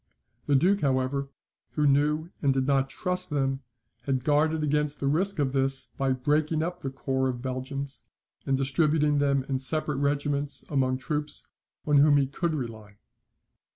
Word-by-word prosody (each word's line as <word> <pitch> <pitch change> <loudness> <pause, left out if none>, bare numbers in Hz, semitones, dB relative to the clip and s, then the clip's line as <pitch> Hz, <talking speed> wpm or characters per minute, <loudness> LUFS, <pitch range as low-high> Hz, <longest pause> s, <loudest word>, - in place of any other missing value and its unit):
The 145 - +3
Duke, 190 +8 +3
however, 135 0 0 0.4
who 150 - +1
knew 150 +4 +2
and 140 - +3
did 135 -1 0
not 135 -1 +2
trust 180 +4 -3
them, 135 -2 -1 0.4
had 130 -2 0
guarded 155 +2 +2
against 150 0 0
the - - -2
risk 180 +8 +1
of 140 -3 0
this, 135 0 0
by 135 -1 0
breaking 150 +4 +1
up 175 +1 -4
the 135 - -4
corps 130 0 -1
of 125 -1 -5
Belgians, 135 +2 -5 0.4
and 135 -1 +1
distributing 150 +2 +2
them 140 -1 +2
in 135 0 -2
separate 150 +2 +1
regiments 145 0 0
among 130 -2 +1
troops 150 +2 -4 0.4
on 150 -1 +3
whom 145 0 +6
he 140 - +3
could 160 +4 -2
rely. 110 -6 -7
140 Hz, 160 wpm, -27 LUFS, 135-150 Hz, 0.4 s, whom